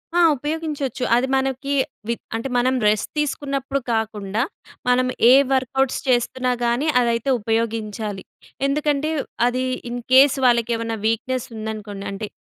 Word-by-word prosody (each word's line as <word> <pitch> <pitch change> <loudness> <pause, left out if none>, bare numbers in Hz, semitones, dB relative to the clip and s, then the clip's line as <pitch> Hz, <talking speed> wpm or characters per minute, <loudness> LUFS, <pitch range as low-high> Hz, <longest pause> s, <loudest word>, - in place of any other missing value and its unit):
ఆ! 350 - +4 0.2
ఉపయోగించొచ్చు. 295 -3 -3
అది 245 +2 +2
మనకి 270 +1 -1 0.3
వి 235 - +1 0.2
అంటే, 230 +4 -3
మనం 255 +2 +2
రెస్ట్ 210 -1 +1
తీసుకున్నప్పుడు 275 -1 -2
కాకుండా 215 -1 -2 0.5
మనం 255 0 +3 0.2
ఏ - - +9 0.2
వర్క్‌ఔట్స్ 265 0 +1
చేస్తున్నా 255 +1 +1
గానీ 240 +6 +1
అదైతే 235 +1 0
ఉపయోగించాలి. 220 -2 -2 0.4
ఎందుకంటే, 295 +1 0 0.4
అది 255 +1 0 0.3
ఇన్‌ 245 0 -4
కేస్ 275 +1 +7
వాళ్ళకేమన్నా 230 -1 +1
వీక్‍నెస్ 250 +3 -1
ఉందనుకోండి 215 -2 -6
అంటే, 200 +2 -5
245 Hz, 120 wpm, -22 LUFS, 225-270 Hz, 0.5 s, ఏ